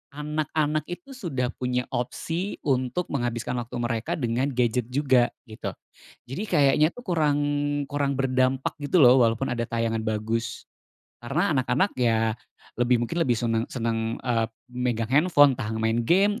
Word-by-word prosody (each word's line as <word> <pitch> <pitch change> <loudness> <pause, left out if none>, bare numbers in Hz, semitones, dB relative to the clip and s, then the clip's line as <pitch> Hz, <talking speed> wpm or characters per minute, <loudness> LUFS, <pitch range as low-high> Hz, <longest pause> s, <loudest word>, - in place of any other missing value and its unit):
anak-anak 150 0 -1
itu 175 +9 -8
sudah 140 - -3
punya 125 -1 -2
opsi 165 +10 -3
untuk 135 +5 -1
menghabiskan 120 -1 -2
waktu 120 +1 -7
mereka 120 -2 -2
dengan 125 -1 0
gadget 125 -3 0
juga, 130 -2 +3 0.2
gitu. 110 -4 -7 0.5
Jadi 135 +11 -5
kayaknya 150 -5 +3
tuh 245 +6 -13
kurang 155 -5 +2 0.5
kurang 140 -1 -1
berdampak 130 0 +1
gitu 145 +5 +2
loh, 130 -3 +7
walaupun 115 +3 +1
ada 120 -2 -2
tayangan 115 -1 -1
bagus. 110 +1 -2 0.5
Karena 155 +9 0
anak-anak 145 +9 +1
ya 115 -2 +2 0.5
lebih 120 -1 +3
mungkin 170 +8 -3
lebih 125 -7 +2
seneng 115 0 -1
seneng, 115 -2 -2
eee, 115 -3 +1 0.3
megang 120 -2 -1
handphone, 145 -2 +5
entah 120 -4 -4
main 110 +1 +1
game, 195 - +3
125 Hz, 145 wpm, -25 LUFS, 115-150 Hz, 0.5 s, loh